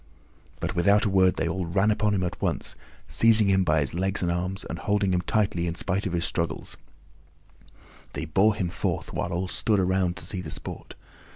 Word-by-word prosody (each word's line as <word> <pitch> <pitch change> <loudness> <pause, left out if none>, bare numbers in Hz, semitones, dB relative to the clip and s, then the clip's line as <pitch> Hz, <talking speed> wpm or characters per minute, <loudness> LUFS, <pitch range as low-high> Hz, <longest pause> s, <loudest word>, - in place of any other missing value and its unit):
But - - -3
without 100 +4 +4
a 100 - +1
word 95 -1 +4
they - - -1
all 95 -2 -2
ran 100 +5 +2
upon 105 0 +1
him 95 - 0
at 90 - -4
once, - - -2 0.3
seizing 110 -3 +4
him 95 -1 +3
by 80 -2 +2
his 70 - -2
legs 95 +3 0
and 85 - +1
arms 90 +3 -3
and 85 - -5
holding 100 +1 +1
him 90 - +1
tightly 95 -4 0
in 85 - -3
spite 100 +2 -2
of 90 - -4
his 85 +1 0
struggles, 85 -1 -3 0.9
and - - -22 0.4
they - - -4
bore 100 +6 +3
him 95 -5 -2
forth - - -3
while 85 - -2
all 90 +2 -2
stood 105 +2 0
around 95 -1 +1
to 85 - -7
see 95 +1 -4
the 80 - -7
sport. - - -6
95 Hz, 210 wpm, -26 LUFS, 85-100 Hz, 0.9 s, without